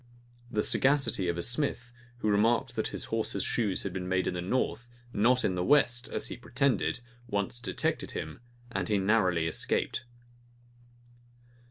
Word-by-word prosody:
The 105 -2 0
sagacity 135 -9 +2
of 85 0 -1
a 85 - -1
smith, 125 -1 0 0.3
who 115 - -2
remarked 110 +3 +2
that - - 0
his - - -4
horse's - - +1
shoes 105 -5 0
had 100 - -4
been 90 -1 -4
made 95 0 +1
in - - -1
the 90 - -3
north, 120 +4 -1 0.2
not 120 +4 +3
in 95 - +1
the 90 0 -1
west, 120 -2 +3
as - - -1
he - - -6
pretended, 135 -1 0 0.3
once 100 +3 -2
detected 120 - -2
him; 80 0 -5 0.3
and 95 -3 -2
he 105 - +3
narrowly 95 -4 +2
escaped. 80 +8 -1
105 Hz, 160 wpm, -30 LUFS, 90-120 Hz, 0.3 s, not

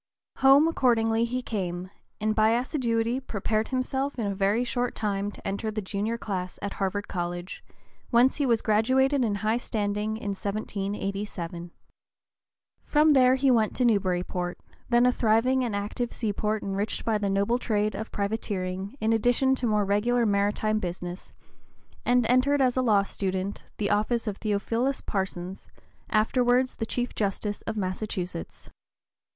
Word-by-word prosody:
Home 275 +4 +6
accordingly 230 -6 +2
he 250 +2 -3
came, 185 -4 -4 0.3
and 215 +1 +1
by 220 +1 +4
assiduity 240 -2 0
prepared 215 -3 -2
himself 265 +2 -2
in 230 - -1
a 200 - -1
very 200 +4 +1
short 245 0 -2
time 205 -1 -1
to - - -10
enter 200 +3 -2
the 215 0 -3
junior 210 +3 -2
class 185 -5 -4
at 200 - -4
Harvard 205 +1 -2
College, 175 0 -4 0.5
whence 245 +2 +4
he 290 - +1
was 230 -2 +2
graduated 260 +5 +3
in 215 -3 0
high 215 +3 0
standing 210 -1 -2
in 205 - -5
1787. 195 -3 -4 1.1
From 300 0 +4
there 255 -1 +5
he 265 0 +3
went 220 -3 +2
to 250 - +1
Newburyport, 180 -4 0 0.3
then 240 0 +4
a 250 - +5
thriving 245 +3 +2
and 230 -4 -2
active 210 +4 -3
seaport 215 -1 -2
enriched 200 +2 -2
by 220 -2 +1
the 200 -1 -1
noble 200 +5 +1
trade 215 -3 0
of 220 - -6
privateering 200 -1 -3
in 220 +1 +2
addition 245 +4 +3
to 255 -2 -1
more 210 -2 +2
regular 230 +5 +2
maritime 210 +1 +1
business, 175 -1 -6 0.7
and 245 -1 +3
entered 255 +4 +3
as 255 -2 +3
a 260 - +2
law 210 -5 +4
student 190 0 -3
the 205 - 0
office 215 +3 +1
of 205 -3 -3
Theophilus 230 +5 -1
Parsons, 190 -2 -4 0.4
afterwards 245 +3 +2
the 225 - -3
Chief 245 +1 -2
Justice 205 0 -2
of 220 - -3
Massachusetts. 185 - -4
215 Hz, 150 wpm, -27 LUFS, 200-245 Hz, 1.1 s, Home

